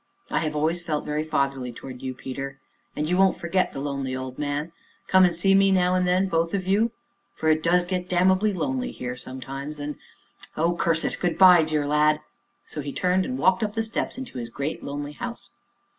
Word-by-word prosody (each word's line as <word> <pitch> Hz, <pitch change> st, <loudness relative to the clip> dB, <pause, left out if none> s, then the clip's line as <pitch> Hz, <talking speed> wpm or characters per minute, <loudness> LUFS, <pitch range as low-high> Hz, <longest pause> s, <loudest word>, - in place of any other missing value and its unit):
"I 155 Hz, -, +1 dB
always 155 Hz, +3 st, 0 dB
felt 155 Hz, -3 st, -2 dB
very 150 Hz, +1 st, -1 dB
fatherly 140 Hz, -5 st, -1 dB
towards 125 Hz, +1 st, -9 dB
you, 130 Hz, -1 st, -4 dB
Peter 135 Hz, +1 st, -6 dB, 0.4 s
and 150 Hz, +1 st, -1 dB
you 180 Hz, +2 st, +1 dB
won't 190 Hz, 0 st, +4 dB
forget 180 Hz, +2 st, 0 dB
the -, -, -6 dB
lonely 140 Hz, -2 st, -3 dB
old 130 Hz, 0 st, -6 dB
man 145 Hz, +2 st, -2 dB, 0.3 s
come 190 Hz, -1 st, +6 dB
and 175 Hz, -2 st, +1 dB
see 195 Hz, +3 st, +3 dB
me 195 Hz, 0 st, +5 dB
now 180 Hz, -1 st, +3 dB
and 185 Hz, 0 st, +2 dB
then 185 Hz, +2 st, +3 dB
both 165 Hz, +1 st, 0 dB
of 185 Hz, -2 st, -2 dB
you, 205 Hz, +5 st, +3 dB, 0.5 s
for 160 Hz, -, 0 dB
it 155 Hz, 0 st, +3 dB
does 175 Hz, +2 st, +3 dB
get 180 Hz, 0 st, -3 dB
damnably 185 Hz, +4 st, +3 dB
lonely 250 Hz, +7 st, -2 dB
here 125 Hz, 0 st, -5 dB
sometimes, 135 Hz, +4 st, -7 dB
and 145 Hz, +1 st, -4 dB, 0.6 s
oh, 170 Hz, +2 st, +2 dB
curse 165 Hz, -1 st, +1 dB
it! -, -, -1 dB
Good 175 Hz, -2 st, 0 dB
by! 180 Hz, -3 st, +8 dB
dear 155 Hz, -2 st, 0 dB
lad." 150 Hz, +1 st, +3 dB, 0.5 s
So 150 Hz, -, -6 dB
he 140 Hz, 0 st, -5 dB
turned, 185 Hz, +3 st, +1 dB
and 255 Hz, 0 st, -3 dB
walked 185 Hz, -2 st, +3 dB
up 210 Hz, 0 st, -2 dB
the 225 Hz, -, +1 dB
steps 225 Hz, +3 st, -3 dB
into 255 Hz, -, -6 dB
his 115 Hz, -1 st, -5 dB
great, 140 Hz, +6 st, -4 dB
lonely 145 Hz, +1 st, -5 dB
house. 245 Hz, +6 st, -7 dB
165 Hz, 205 wpm, -25 LUFS, 145-185 Hz, 0.6 s, by